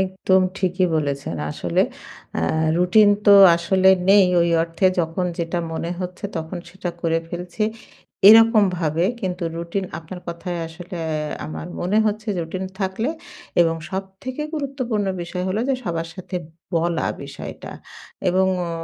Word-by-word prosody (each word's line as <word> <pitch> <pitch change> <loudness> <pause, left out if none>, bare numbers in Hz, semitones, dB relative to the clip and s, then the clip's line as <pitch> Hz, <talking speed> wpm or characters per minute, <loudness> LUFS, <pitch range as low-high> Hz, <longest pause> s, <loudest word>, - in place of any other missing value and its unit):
একদম 190 0 +2 0.2
ঠিকই 185 0 +1
বলেছেন। 140 - -2
আসলে 85 +3 0 0.6
আ - - 0 0.4
রুটিন 195 +4 +5 0.2
তো 205 - +9 0.2
আসলে 185 +2 +3 0.2
নেই। 200 -1 +7
ওই 170 - +3
অর্থে 165 +3 0
যখন 165 +2 -2
যেটা 170 +1 -1
মনে 165 +1 -3
হচ্ছে 180 +2 -6
তখন 165 +3 -4
সেটা 185 -2 -5
করে 165 -1 +1
ফেলছি। 180 +5 -5 0.7
এরকমভাবে 190 -8 +5 0.2
কিন্তু 180 -2 -3
রুটিন 170 +3 -3
আপনার 175 +2 -9
কথায় 170 +1 -4
আসলে 175 +2 -9
অ্যা 150 -1 -3
আমার 80 0 -6
মনে 195 +5 +1
হচ্ছে 215 +1 -2
রুটিন 185 +3 -4 0.2
থাকলে 195 +8 -1 0.5
এবং 165 -1 +3
সবথেকে 195 +9 -5
গুরুত্বপূর্ণ 255 -8 -2 0.2
বিষয় 180 +1 -4
হলো 205 +4 -1
যে 270 - +3
সবার 165 -1 -3
সাথে 185 0 -6 0.4
বলা 170 +1 0 0.2
বিষয়টা - - -8 0.6
এবং 190 +1 +3 0.2
অ - - -4
180 Hz, 135 wpm, -22 LUFS, 165-195 Hz, 0.7 s, তো